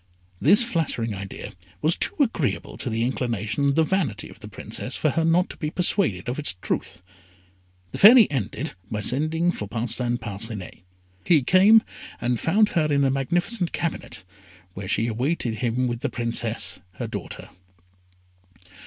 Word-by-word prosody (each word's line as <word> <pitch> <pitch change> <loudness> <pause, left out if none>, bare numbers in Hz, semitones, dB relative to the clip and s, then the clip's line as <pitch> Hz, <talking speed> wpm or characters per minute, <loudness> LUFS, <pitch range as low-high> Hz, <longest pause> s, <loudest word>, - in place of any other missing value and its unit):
This 210 +4 +5
flattering 155 - -1
idea 100 -1 -7 0.3
was 160 +2 +3
too - - -2
agreeable 225 - 0
to - - -2
the 115 0 -1
inclination 120 -1 -2
and 140 -1 +2
the 160 - +4
vanity 190 -3 -1
of - - -15
the - - -10
Princess - - -4
for - - +1
her 165 - 0
not 170 +3 +3
to - - -12
be 150 - -3
persuaded 160 - 0
of 125 +4 -3
its 145 -10 0
truth. 90 - -3 0.9
The - - -6
Fairy 225 +1 +9
ended 135 +3 -3 0.2
by 105 -1 -3
sending 155 +9 +1
for 105 - -6
Parcin 120 +2 +1
Parcinet. 105 -3 -5 0.4
He 155 -6 +4
came, 200 - +6 0.4
and 120 -1 -1
found 210 +5 +3
her 155 -4 0
in 140 -1 +3
a 135 - +3
magnificent 175 - -1
cabinet, 125 - -4 0.5
where 95 +1 -7
she 110 - +1
awaited 120 0 -1
him 125 +1 0
with 120 -1 -3
the - - -2
Princess, 115 -6 -2
her - - -5
daughter. - - -7
130 Hz, 160 wpm, -24 LUFS, 115-170 Hz, 0.9 s, Fairy